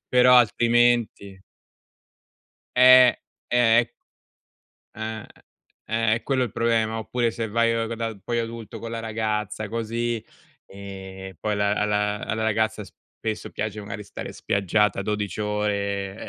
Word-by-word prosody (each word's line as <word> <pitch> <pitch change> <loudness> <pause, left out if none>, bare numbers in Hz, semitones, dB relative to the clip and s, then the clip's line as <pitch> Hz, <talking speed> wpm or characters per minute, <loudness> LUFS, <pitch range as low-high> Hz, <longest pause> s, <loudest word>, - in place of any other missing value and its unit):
però 125 0 +6
altrimenti 120 -4 +2 1.3
Eh, 125 0 +8 0.4
eh. 120 -1 +4 1.0
Ah, 110 0 -5 0.6
eh, 115 -1 +1
è 115 - -6
quello 130 -2 0
il 120 - -2
problema, 115 -1 +1
oppure 115 +1 -1
se 115 0 -4
vai 115 +2 +2
proprio 115 0 -2
da, 115 -2 -4
poi 120 +3 -2
adulto 115 -1 -5
con 115 +2 -7
la 115 - -4
ragazza, 110 -1 -3
così, 115 0 -2 0.4
ehm, 95 -1 -9
poi 105 -1 -1
la 100 0 +1
alla 105 0 0
alla 110 +1 -2
ragazza 110 -1 0
spesso 110 +3 -7
piace 105 -1 -4
magari 105 0 -7
stare 100 - -8
spiaggiata 100 +1 +1
12 105 0 -3
ore, 100 -2 -2
110 Hz, 125 wpm, -24 LUFS, 105-115 Hz, 1.3 s, Eh